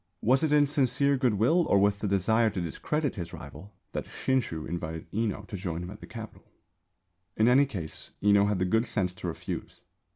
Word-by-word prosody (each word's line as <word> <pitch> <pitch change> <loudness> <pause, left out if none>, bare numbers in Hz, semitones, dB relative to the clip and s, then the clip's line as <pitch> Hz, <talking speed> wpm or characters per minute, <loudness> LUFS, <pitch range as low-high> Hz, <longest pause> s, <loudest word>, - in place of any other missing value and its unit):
Was 130 +6 +4
it 155 - +1
in 150 -1 +5
sincere 140 0 +2
goodwill 125 - +2
or - - +5
with 100 0 +3
the 105 - -2
desire 110 +4 +3
to 100 - -4
discredit 145 - -2
his 85 -4 -6
rival 100 - -10 0.2
that - - -3
Shinshū 120 -12 -1
invited 80 -2 -4
Enō 105 -2 -2
to 105 - -7
join 90 -3 -4
him 90 - -7
at 105 - -10
the - - -11
Capital? 115 -2 -10 0.9
In 110 - +4
any 135 +3 +5
case 90 - -7
Enō 100 0 +5
had 105 -1 +1
the 90 - +1
good 110 +6 +2
sense 90 -4 0
to 90 - -6
refuse. 85 - -6
105 Hz, 195 wpm, -28 LUFS, 90-125 Hz, 0.9 s, in